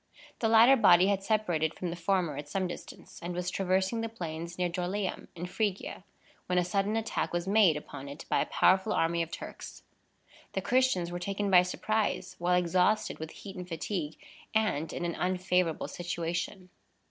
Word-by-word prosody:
The 225 - +1
latter 230 +4 +8
body 185 -6 +6
had 200 -1 +1
separated 175 -7 0
from 180 -2 -4
the - - -4
former 175 -1 0
at 145 0 -7
some 185 +3 -1
distance, 175 - -10
and 175 +1 -4
was 180 0 -2
traversing 190 +4 +1
the 225 - -3
plains 170 -4 -6
near 180 -1 +1
Dorylæum, 185 +3 -3
in 175 +1 -5
Phrygia, 200 +1 -2 0.4
when 180 - +1
a 180 - +4
sudden 200 +3 0
attack 225 0 -2
was 175 +1 -2
made 195 -6 +5
upon 140 -2 -8
it 145 +3 -9
by - - +2
a - - -1
powerful 190 +3 +3
army 170 +1 +1
of 165 - -2
Turks. - - -8 0.7
The 190 - -1
Christians 240 -6 +2
were 175 - -4
taken 200 +2 -2
by 180 -1 +8
surprise, 200 +1 -1
while 180 +1 +2
exhausted 180 +4 +2
with 160 0 -5
heat 195 +4 -10
and 180 -1 -7
fatigue, 165 -2 -3 0.4
and 165 -8 +1
in 175 - -3
an 170 - -1
unfavorable 180 -2 0
situation. 175 +2 -4
180 Hz, 180 wpm, -30 LUFS, 170-200 Hz, 0.7 s, latter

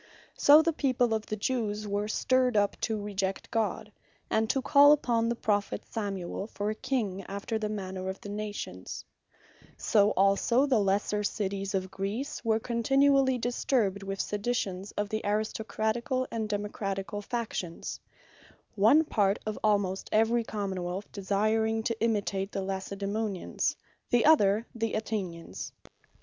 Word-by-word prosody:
So 300 +2 +7
the 330 0 +1
people 255 -5 +1
of 220 -1 -2
the 215 - -2
Jewes 215 -2 -2
were 205 +1 -1
stirred 255 +1 +2
up 205 -1 +2
to 220 -1 -1
reject 195 -2 -3
God, 215 -1 -1 0.4
and 220 0 +2
to 270 - +2
call 285 +2 +7
upon 235 -5 +1
the 235 - 0
Prophet 205 -3 -1
Samuel, 200 -2 -3
for 210 -1 -3
a - - -1
King 220 -6 -2
after 200 +3 -3
the 215 -1 -2
manner 190 -2 -4
of 190 - -5
the - - -10
Nations; 205 - -5 0.7
So 205 -1 +3
also 200 +7 +4
the 260 -6 +3
lesser 205 +1 +1
Cities 195 -1 -2
of 190 0 -2
Greece, 205 +10 -4
were 220 -1 +2
continually 265 +3 +3
disturbed, 235 -4 0
with 195 0 -5
seditions 205 -3 -2
of 205 - -1
the 215 +1 -2
Aristocraticall, 220 +4 -1
and 220 -2 -2
Democraticall 205 -1 -3
factions; 220 -8 -4 0.7
one 225 +10 +5
part 205 -8 +1
of 215 0 -3
almost 200 -3 +1
every 225 +2 +3
Common 200 -4 -3
wealth, 180 +3 -5
desiring 215 +3 0
to 225 -1 -2
imitate 200 -3 0
the 195 - -2
Lacedaemonians; 195 +1 -2 0.3
the 240 -1 +3
other, 220 -8 +5
the 225 -2 -2
Athenians. 185 - -4
210 Hz, 140 wpm, -29 LUFS, 195-230 Hz, 0.7 s, So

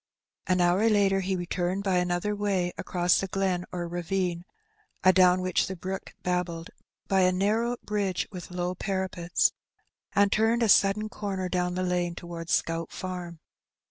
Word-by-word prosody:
An 185 -1 +2
hour 180 +6 +3
later 200 -2 +3
he 190 0 -1
returned 180 +2 -2
by 190 -2 +1
another 180 +3 0
way 195 -4 0
across 175 -1 +1
the 195 - -2
glen 185 -2 -1
or 175 -1 -3
ravine 175 0 -2 0.6
(adown 185 -1 +5
which 185 -1 +1
the 190 - -5
brook 190 +2 -6
babbled) 180 -2 -2 0.4
by 195 - +2
a 185 0 +4
narrow 220 +6 +1
bridge 200 -3 -1
with 180 -3 -8
low 180 0 -2
parapets, 185 -2 0 0.6
and 200 0 +4
turned 225 +2 +2
a 225 - +2
sudden 200 +2 +4
comer 195 -3 -4
down 180 0 -1
the 185 - -1
lane 175 -1 -1
towards 170 -1 -7
Scout 165 0 0
Farm. 180 -3 -6
185 Hz, 155 wpm, -27 LUFS, 175-195 Hz, 0.6 s, adown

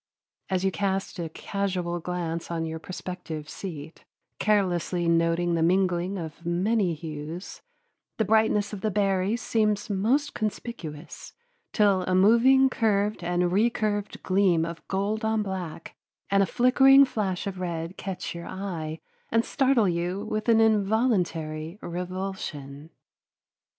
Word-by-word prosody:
As 190 -1 0
you 190 - +2
cast 195 -1 -2
a 165 -2 -3
casual 180 -1 -3
glance 170 -1 -4
on 165 -1 -2
your 160 0 -5
prospective 175 -3 -6
seat, 160 -3 -8 0.4
carelessly 180 -4 +1
noting 170 +1 +2
the 165 - +1
mingling 180 +2 +1
of 160 -1 -7
many 180 +1 +1
hues, 155 +3 -7 0.6
the 220 - +1
brightness 215 0 +2
of 200 - -6
the 215 - 0
berries 195 +2 0
seems 210 -2 0
most 250 +10 +1
conspicuous, 190 -8 -6 0.4
till 200 -3 +3
a 185 - +2
moving 235 +7 +6
curved 210 -5 0
and 175 0 +1
recurved 210 0 0
gleam 185 -4 +3
of 170 0 -7
gold 205 +3 -1
on 220 -1 +1
black 185 -5 -6 0.4
and 195 0 +4
a 195 - +3
flickering 270 +2 +6
flash 205 -8 -2
of 195 -2 -4
red 170 0 -4
catch 190 -2 -5
your 170 0 -7
eye 165 -5 -5 0.3
and 230 +1 +2
startle 265 -6 +2
you 180 +4 -2
with 215 +1 -2
an 225 -1 +6
involuntary 195 -7 +1
revulsion. 175 -6 -5
190 Hz, 130 wpm, -26 LUFS, 170-210 Hz, 0.6 s, moving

